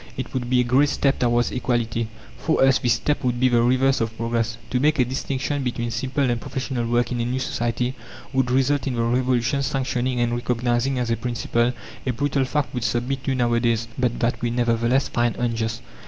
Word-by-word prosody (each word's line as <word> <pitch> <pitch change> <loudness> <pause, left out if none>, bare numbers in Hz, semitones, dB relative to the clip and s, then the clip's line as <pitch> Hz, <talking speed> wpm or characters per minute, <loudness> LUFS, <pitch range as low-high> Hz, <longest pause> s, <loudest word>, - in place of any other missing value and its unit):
It 130 - -5
would 125 -2 -2
be 125 -1 +3
a - - +4
great 130 +4 +3
step 140 -1 +1
towards 120 0 +2
equality." 115 -2 -1 0.3
For 160 - +1
us 135 -1 +5
this 120 - +2
step 150 - -1
would 125 -1 0
be 130 0 +4
the 120 -1 +3
reverse 130 +2 +3
of 115 0 -2
progress. 115 0 -1
To 125 - +1
make 150 +3 +3
a 125 - +4
distinction 135 +2 -2
between 120 -2 -2
simple 130 +4 0
and 120 -1 -2
professional 130 -2 -3
work 120 +1 +1
in 120 - -1
a - - 0
new 125 +2 -1
society 125 -1 -1 0.4
would 130 -1 +1
result 135 +3 +2
in 130 - -1
the 115 - 0
Revolution 125 +2 +1
sanctioning 130 -2 -1
and 120 0 +1
recognizing 120 +2 0
as 120 -2 -1
a 115 - +1
principle 120 0 0 0.4
a 125 - +1
brutal 135 +1 0
fact 145 +1 -1
we 125 - -2
submit 120 +4 -1
to 135 - +1
nowadays, 115 -2 +1
but 125 -2 0
that 120 0 0
we 120 - 0
nevertheless 120 +2 +1
find 120 -1 0
unjust. 115 -1 -2
125 Hz, 205 wpm, -23 LUFS, 120-130 Hz, 0.4 s, us